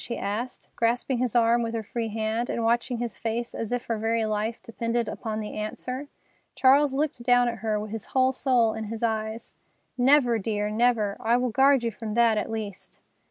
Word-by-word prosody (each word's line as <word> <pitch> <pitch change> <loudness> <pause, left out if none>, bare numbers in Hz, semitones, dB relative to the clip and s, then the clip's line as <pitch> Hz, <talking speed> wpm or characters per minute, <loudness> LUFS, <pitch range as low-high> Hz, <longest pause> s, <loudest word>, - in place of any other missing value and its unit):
she 235 - -4
asked, 225 +5 -4
grasping 240 +2 0
his 250 -2 -1
arm 235 0 +4
with 230 0 -2
her 225 - -2
free 230 +1 -3
hand 220 +2 -2
and 235 - -1
watching 240 +2 +1
his 235 -2 -4
face 230 +1 -3
as 225 -1 -4
if 245 0 -2
her 230 -2 -2
very 225 +1 +1
life 215 +2 -2
depended 230 0 -2
upon 215 0 -4
the 210 -1 -5
answer. 250 +6 -5 0.5
Charles 275 +1 +5
looked 285 -3 -1
down 245 0 +4
at 235 -2 -3
her, 215 -1 -1
his 215 -1 -6
whole 260 0 +2
soul 250 -4 +2
in 220 0 -5
his 225 +2 -6
eyes. 220 0 -3 0.4
"Never, 250 -3 +4
dear, 210 0 -2
never. 220 -3 +1
I 235 +2 +2
will 250 -1 0
guard 270 +1 +4
you 230 - 0
from 215 0 -6
that, 235 -2 +4
at - - -4
least." 215 -4 -6
230 Hz, 200 wpm, -26 LUFS, 220-245 Hz, 0.5 s, Charles